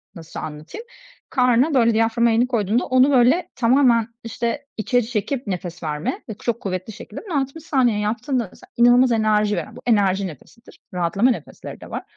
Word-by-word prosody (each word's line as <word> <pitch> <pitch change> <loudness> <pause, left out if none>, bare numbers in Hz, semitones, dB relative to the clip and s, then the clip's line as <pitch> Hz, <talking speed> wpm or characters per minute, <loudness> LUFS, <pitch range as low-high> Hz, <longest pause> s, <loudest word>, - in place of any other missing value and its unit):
nasıl 165 -2 -9
anlatayım, 155 - -8 0.4
karna, 250 +3 +3
böyle, 235 -3 +4
diyaframa 225 +1 +2
elini 235 +2 +2
koyduğunda 230 -1 0
onu, 255 +2 +4
böyle, 275 +8 +3
tamamen, 240 -2 +3 0.2
işte, 230 +3 -3
içeri 240 +1 0
çekip 245 +3 -3
nefes 175 -3 -5
verme 155 - -3
ve - - -3
çok 235 +2 -3
kuvvetli 185 +2 -4
şekilde. 210 - -9
Bunu 335 -8 -1
60 275 +4 -7
saniye 250 -8 +1
yaptığında 235 +3 -1
mesela - - -18
inanılmaz 245 +1 +5
enerji 215 -1 +2
veren, - - -6
bu - - -11
enerji 200 -4 +2
nefesidir; 180 - -14
rahatlama 180 +8 +2
nefesleri - - -8
de - - -11
var. - - -4
230 Hz, 170 wpm, -21 LUFS, 205-255 Hz, 0.4 s, inanılmaz